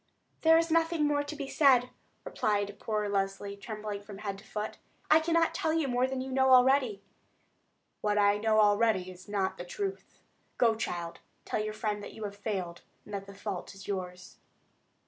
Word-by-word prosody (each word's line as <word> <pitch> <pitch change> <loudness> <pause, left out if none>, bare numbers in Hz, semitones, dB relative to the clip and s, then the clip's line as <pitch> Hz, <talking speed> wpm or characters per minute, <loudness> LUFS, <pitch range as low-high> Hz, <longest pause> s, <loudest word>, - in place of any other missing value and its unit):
"Then 320 - +2
there - - +8
is 330 0 +1
nothing 330 -1 +2
more 290 0 +2
to 290 +1 -6
be 285 -2 -5
said," 260 -4 +4 0.3
replied 205 -1 -1
poor 210 -1 -1
Leslie, 200 0 -2
trembling 210 0 -6
from 205 -1 -10
head 200 -1 -5
to - - -15
foot. 210 0 -5 0.3
"I 310 - +8
cannot 330 0 +2
tell 330 -3 0
you 320 -3 +1
more 250 0 +1
than 260 0 -3
you 265 0 -5
know 265 0 +3
already." 250 -5 +4 1.0
"What 210 0 +1
I 205 0 +4
know 215 0 +3
already 205 -3 +3
is 185 +2 -14
not 195 -2 -1
the - - -4
truth. 390 - -6 0.3
Go, 230 -2 +4
child; 175 -6 -4 0.3
tell 215 - -1
your 215 0 -3
friend 210 -2 -2
that - - -9
you 220 - -7
have 200 -1 -5
failed, 190 -5 -4 0.2
and 210 - -11
that 195 0 -4
the 200 - -11
fault 200 -1 -5
is 195 - -12
yours." 180 -2 -5
215 Hz, 190 wpm, -30 LUFS, 200-265 Hz, 1.0 s, there